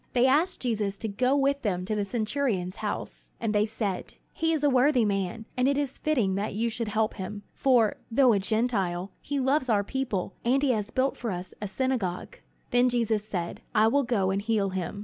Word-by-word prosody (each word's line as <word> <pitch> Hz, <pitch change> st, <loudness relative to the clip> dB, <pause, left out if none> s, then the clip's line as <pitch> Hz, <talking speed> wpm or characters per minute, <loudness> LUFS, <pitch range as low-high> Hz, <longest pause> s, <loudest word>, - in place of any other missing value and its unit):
They 245 Hz, 0 st, +4 dB
asked 305 Hz, +8 st, +2 dB
Jesus 210 Hz, -5 st, -1 dB
to 220 Hz, -, -3 dB
go 250 Hz, +6 st, +1 dB
with 280 Hz, 0 st, +2 dB
them 180 Hz, -4 st, -1 dB
to 215 Hz, -, -2 dB
the 210 Hz, -1 st, 0 dB
centurion's 215 Hz, -4 st, -1 dB
house; -, -, -5 dB
and 225 Hz, -2 st, -1 dB
they 210 Hz, 0 st, +3 dB
said: 210 Hz, -4 st, -3 dB, 0.2 s
"He 325 Hz, 0 st, 0 dB
is 310 Hz, -3 st, 0 dB
a -, -, +5 dB
worthy 255 Hz, -1 st, +4 dB
man, 195 Hz, +2 st, -2 dB
and 250 Hz, +1 st, +2 dB
it 280 Hz, 0 st, +2 dB
is 285 Hz, -2 st, -2 dB
fitting 245 Hz, -11 st, +1 dB
that 200 Hz, +1 st, -2 dB
you 230 Hz, +2 st, 0 dB
should 230 Hz, 0 st, -3 dB
help 215 Hz, +1 st, 0 dB
him, 205 Hz, +2 st, -6 dB
for, 245 Hz, -5 st, +3 dB
though 245 Hz, 0 st, +5 dB
a 200 Hz, -, +2 dB
Gentile, 195 Hz, -4 st, 0 dB
he 285 Hz, -1 st, -2 dB
loves 265 Hz, 0 st, +1 dB
our 205 Hz, -3 st, +3 dB
people, 210 Hz, -6 st, -2 dB
and 265 Hz, +4 st, +2 dB
he 275 Hz, -, +4 dB
has 215 Hz, -3 st, -1 dB
built 260 Hz, +3 st, 0 dB
for 235 Hz, -, -3 dB
us 180 Hz, -1 st, -5 dB
our 210 Hz, -, -2 dB
synagogue." 250 Hz, -, -2 dB, 0.3 s
Then 245 Hz, +1 st, +4 dB
Jesus 230 Hz, -3 st, +1 dB
said, 175 Hz, -5 st, -4 dB
"I 215 Hz, +1 st, +5 dB
will 280 Hz, +4 st, +3 dB
go 220 Hz, -7 st, +1 dB
and 195 Hz, +1 st, 0 dB
heal 205 Hz, -3 st, 0 dB
him." 190 Hz, +2 st, -4 dB
225 Hz, 210 wpm, -27 LUFS, 200-260 Hz, 0.3 s, a